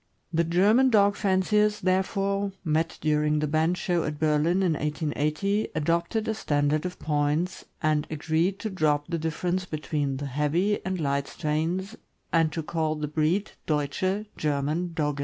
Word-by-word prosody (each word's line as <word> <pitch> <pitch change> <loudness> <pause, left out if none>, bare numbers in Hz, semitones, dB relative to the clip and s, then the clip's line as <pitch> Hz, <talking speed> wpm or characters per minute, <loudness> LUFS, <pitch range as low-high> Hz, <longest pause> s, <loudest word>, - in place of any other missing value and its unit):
The 165 +1 +3
German 205 +10 +4
dog 205 -3 +4
fanciers, 210 +2 +2
therefore, 195 +1 0
met 160 0 0
during 150 0 +2
the 150 - +1
bench 160 +4 +1
show 175 -3 0
at 150 0 -3
Berlin, 155 +4 +2
in 175 -3 +2
1880, 155 +7 -1
adopted 170 +8 0
a 220 - +1
standard 150 -4 0
of 180 - -8
points, 150 +4 -1 0.2
and 155 -1 +1
agreed 160 +5 0
to 220 - -3
drop 150 -5 +1
the 170 -2 -1
dif 160 0 -3
ference 185 +1 -1
between 150 -3 -2
the 145 - -4
heavy 150 +9 0
and 190 -1 -2
light 140 -2 0
strains 170 +7 -2 0.4
and 165 -2 +3
to 160 +1 -3
call 155 0 -1
the 150 -1 -3
breed 155 +7 0 0.2
Deutsche 175 +7 0
(German) 150 +4 -1
Dogge. 150 -3 -1
160 Hz, 160 wpm, -26 LUFS, 150-190 Hz, 0.4 s, German